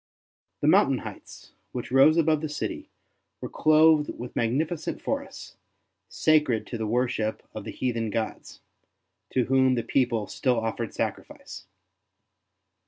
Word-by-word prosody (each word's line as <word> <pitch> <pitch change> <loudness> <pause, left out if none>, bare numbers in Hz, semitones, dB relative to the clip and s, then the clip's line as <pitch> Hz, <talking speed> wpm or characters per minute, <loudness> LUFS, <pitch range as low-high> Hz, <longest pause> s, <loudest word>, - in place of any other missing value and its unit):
The - - +1
mountain - - +4
heights, - - -10 0.2
which 125 -1 -5
rose 140 +5 +6
above 160 -2 +2
the 155 - -3
city, 150 - -5 0.5
were - - -6
clothed 155 -1 +4
with 120 +1 -8
magnificent 150 +8 -1
forests, - - -5 0.5
sacred 150 -8 +2
to 120 - -6
the 110 - -2
worship 115 -2 -1
of 110 - -7
the - - -5
heathen 115 -3 -2
gods, 110 +1 -5 0.7
to 130 - +1
whom 130 0 +3
the 120 - -1
people 120 -5 0
still 125 +1 0
offered 115 -1 -4
sacrifice. - - -5
125 Hz, 130 wpm, -26 LUFS, 115-150 Hz, 0.7 s, rose